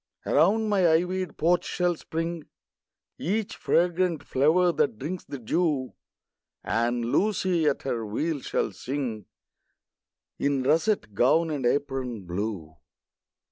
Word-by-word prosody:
Around 205 +9 +3
my 195 -5 +3
ivy'd 180 +2 0
porch 175 +2 +2
shall 180 -1 0
spring 165 0 -4 0.7
Each 205 +4 -1
fragrant 175 -2 +1
flower 160 +7 +3
that 140 -8 0
drinks 165 +9 -5
the 140 - -6
dew; 135 +1 -1 0.7
And 120 +2 0
Lucy, 180 - +1
at 145 - 0
her 120 -4 -2
wheel, 145 +9 -2
shall - - -1
sing 125 -6 -4 1.1
In 140 -2 +1
russet 160 - +1
gown 160 +10 +3
and 135 -5 0
apron 130 -5 -1
blue. 90 -3 -4
150 Hz, 115 wpm, -26 LUFS, 125-175 Hz, 1.1 s, Around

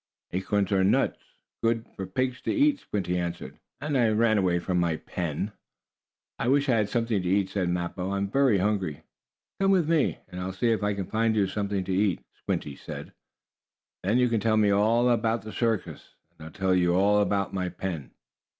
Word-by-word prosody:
"Acorns 95 +2 0
are 95 -1 +3
nuts, 95 - +2 0.4
good 115 0 +1
for 95 - -5
pigs 130 +6 -2
to - - -1
eat," 290 -1 +3
Squinty 90 -3 -2
answered, 85 0 -5 0.2
"and 150 -1 -2
I 120 -4 +4
ran 110 0 +3
away 90 -2 +2
from 90 +1 -1
my 85 -2 +1
pen." 85 +5 -4 0.9
"I - - -1
wish 140 +2 +3
I 120 - +4
had 105 -2 +1
something 115 -3 0
to 90 - -2
eat," 95 0 +2
said 95 -3 0
Mappo. 90 +1 -2
"I 100 - -1
am 100 0 -1
very 130 0 +3
hungry." 95 -6 -1 0.6
"Come 195 0 +3
with 185 -5 +3
me, 160 -3 +2
and 90 -1 -6
I'll 95 +1 -3
see 115 +4 +1
if 110 - 0
I 105 0 0
can't 95 -2 -5
find 110 0 +2
you 105 -2 +3
something 100 0 -2
to 95 - -3
eat," 95 -1 +1
Squinty 70 - -4
said. - - -8 0.9
"Then 105 +6 +1
you 125 0 +4
can 115 -2 +1
tell 110 +1 +2
me 105 -1 +4
all 110 +4 +3
about 115 -1 +1
the 110 - -7
circus, 115 -4 -2 0.2
and 80 - -11
I'll - - -10
tell 95 +1 0
you 90 -1 +3
all 100 +2 +4
about 100 -1 0
my 90 -2 -1
pen." 85 -6 -5
100 Hz, 205 wpm, -27 LUFS, 95-115 Hz, 0.9 s, I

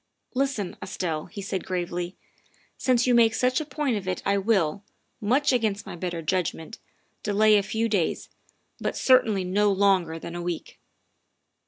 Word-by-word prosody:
" - - -43
Listen, 235 -9 -3
Estelle," 165 -5 -3
he 200 +2 -8
said 190 -1 -3
gravely, 175 0 -3 0.3
" - - -36
since 250 -2 +2
you 250 - +3
make 230 -2 +5
such 255 +3 +2
a - - -5
point 290 -6 -1
of 190 -2 -6
it 185 -1 -2
I 200 - +2
will, 200 -3 +1 0.4
much 260 +7 +2
against 220 -5 0
my - - -7
better 175 -1 -4
judg 180 +1 0
ment, 160 +8 -10 0.4
delay 210 +1 +4
a 205 - +5
few 220 +3 -1
days, 200 -7 0 0.5
but - - -2
certainly 225 -7 +4
no 200 +3 +2
longer 190 -4 +2
than 170 - -7
a 175 - -4
week. 175 -2 -5
200 Hz, 175 wpm, -26 LUFS, 180-225 Hz, 0.5 s, make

